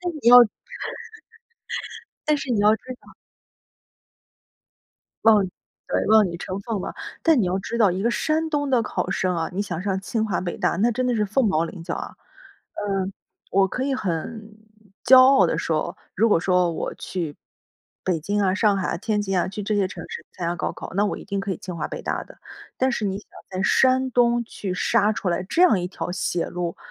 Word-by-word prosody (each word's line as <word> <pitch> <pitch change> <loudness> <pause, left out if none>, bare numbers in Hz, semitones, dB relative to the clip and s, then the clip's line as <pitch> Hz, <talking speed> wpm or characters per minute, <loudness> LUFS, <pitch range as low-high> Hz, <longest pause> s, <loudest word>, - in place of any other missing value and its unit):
但 355 -1 -3
你 280 -7 0
要 245 - +10 1.9
但 300 -1 +2
是 275 -2 -6
你 225 -4 +1
要 210 +1 +6
知 - - -42 0.2
道 - - -18 2.1
嗯， 210 -4 +5 0.4
对， - - 0
望 215 -2 +6
女 170 -1 -5
成 185 +2 -5
凤 215 -2 -3
吧。 - - -5 0.3
但 325 -4 +4
你 - - +2
要 185 +2 0
知 230 +4 -4
道， 210 -5 +4
一 185 +2 -2
个 235 - +2
山 320 +5 0
东 290 -2 -1
的 245 -3 +3
考 - - -3
生 180 -2 0
啊， 165 -1 -2
你 195 - -2
想 180 -4 -3
上 195 -1 -1
清 220 +3 -1
华 195 -5 -1
北 175 -1 -4
大 180 -3 0
那 230 +5 +3
真 255 +2 -1
的 245 - +1
是 210 -2 +1
凤 225 +4 +1
毛 165 -4 +2
麟 165 +1 -8
角 - - -3
啊。 - - -6 0.6
嗯， 195 -2 -2 0.4
我 195 0 +3
可 255 +7 -3
以 275 - 0
很 215 +2 -4 0.5
骄 255 +1 +8
傲 270 +1 +6
地 - - -1
说， - - -1 0.2
如 230 - +3
果 165 - +4
说 180 -2 +2
我 - - -4
去 165 -5 -5 0.7
北 180 -3 +1
京 205 +5 -1
啊、 190 -1 +2
上 205 -1 +3
海、 185 - -1
天 210 +1 -1
津 195 -2 0
啊， 175 - +1
去 205 +2 -5
这 210 +1 -1
些 195 -2 +2
城 - - -8
市 - - -7
参 170 - -4
加 175 - -2
高 - - -2
考 - - -9
那 205 - +3
我 - - -3
一 - - -11
定 200 0 -2
可 195 - -4
以 - - -6
清 180 -3 -7
华 155 - -2
北 - - -6
大 - - -2
的。 - - -17 0.4
但 260 +1 +2
是 215 - -2
你 195 0 -1
想 - - -15 0.2
在 185 0 -3
山 260 +4 +3
东 240 -1 +3
去 200 -4 -5
杀 205 +3 +2
出 200 - -3
来 175 +1 0
这 330 - -2
样 220 - +5
一 - - -1
条 180 - -5
血 175 -2 -1
路， 175 -1 -4
205 Hz, 230 characters per minute, -23 LUFS, 185-235 Hz, 2.1 s, 要